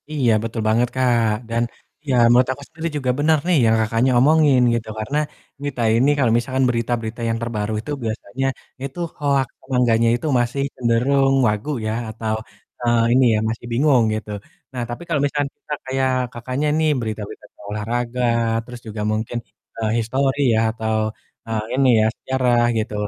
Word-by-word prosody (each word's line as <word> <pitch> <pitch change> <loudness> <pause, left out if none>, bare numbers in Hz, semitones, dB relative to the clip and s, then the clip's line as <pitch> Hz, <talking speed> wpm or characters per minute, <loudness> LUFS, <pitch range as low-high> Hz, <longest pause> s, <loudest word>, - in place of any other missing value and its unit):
Iya 140 -6 +1
betul 115 0 -3
banget, 115 +3 +3
Kak. 120 -3 +2 0.2
Dan, 115 +1 +1 0.5
ya 130 - +2 0.2
menurut 125 +1 +4
aku 140 - -12
sendiri 165 +1 -4
juga 130 -3 0
benar 155 +2 +4
nih 180 -3 +4
yang 110 0 +4
Kakaknya 115 +4 +1
omongin 145 -1 +5
gitu, 115 -1 -2
karena 125 +7 -2 0.4
nih 145 0 -2
ta 120 - 0
ini, 130 +5 +4
kalau 130 -5 +2
misalkan 130 +2 0
berita-berita 115 -1 -2
yang 115 - 0
terbaru 110 -2 -2
itu 130 - -7
biasanya 110 +3 -3 0.4
itu 135 +4 -6 0.2
hoak 140 -3 +1
atau - - -25
engganya 115 -2 +3
itu 120 - -4
masih 120 +3 -1
cenderung 130 +3 +2
wagu 105 +7 -1 0.2
ya - - 0 0.2
atau, 110 0 -3 0.5
eee, 120 -1 +3
ini 130 +1 +5
ya - - +1
masih 115 +1 -5
bingung 130 0 +4
gitu. 110 0 -6 0.4
Nah 125 - -3
tapi 120 - -5
kalau 165 -4 0
misalkan, 145 0 0 0.2
ka 150 - 0
kayak 130 0 0 0.2
Kakaknya 130 +5 -2
nih 160 -1 +2
berita-berita 110 -3 -5
kayak - - -16
olahraga, 115 +4 -2 0.4
terus 125 0 -9
juga 105 0 -5
mungkin, 110 +2 -2 0.4
eee, 110 -1 -1
histori 135 +5 0
ya - - +3
atau, 110 -1 -2 0.5
eee, 110 -1 -2
ini 135 -1 +4
ya - - +3
sejarah 125 -2 +1 0.2
gitu, 110 -1 -2
120 Hz, 170 wpm, -21 LUFS, 115-135 Hz, 0.5 s, omongin